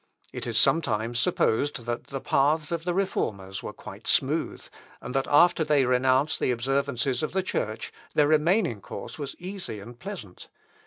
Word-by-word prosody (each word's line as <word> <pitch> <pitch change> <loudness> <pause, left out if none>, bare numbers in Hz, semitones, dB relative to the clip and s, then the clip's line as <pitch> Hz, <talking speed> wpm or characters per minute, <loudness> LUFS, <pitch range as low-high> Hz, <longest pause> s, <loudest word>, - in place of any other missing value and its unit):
It - - -5
is - - -1
sometimes 115 -6 +2
supposed 120 +2 +1
that 120 0 -3
the 135 - -4
paths 150 +4 +2
of 165 -1 -2
the 175 - 0
Reformers 100 - -2
were - - -5
quite - - -11
smooth, - - 0 0.3
and 125 - -7
that 135 0 0
after 170 +2 +5
they 150 -3 +3
renounced 130 +4 +2
the - - +1
observances 125 0 0
of 155 - -2
the 190 0 +1
Church, 110 - -3 0.2
their 150 -1 +5
remaining 155 - +2
course - - -8
was 140 -2 -5
easy 185 - -6
and 120 +4 -11
pleasant. 180 - -8
135 Hz, 165 wpm, -27 LUFS, 120-160 Hz, 0.3 s, after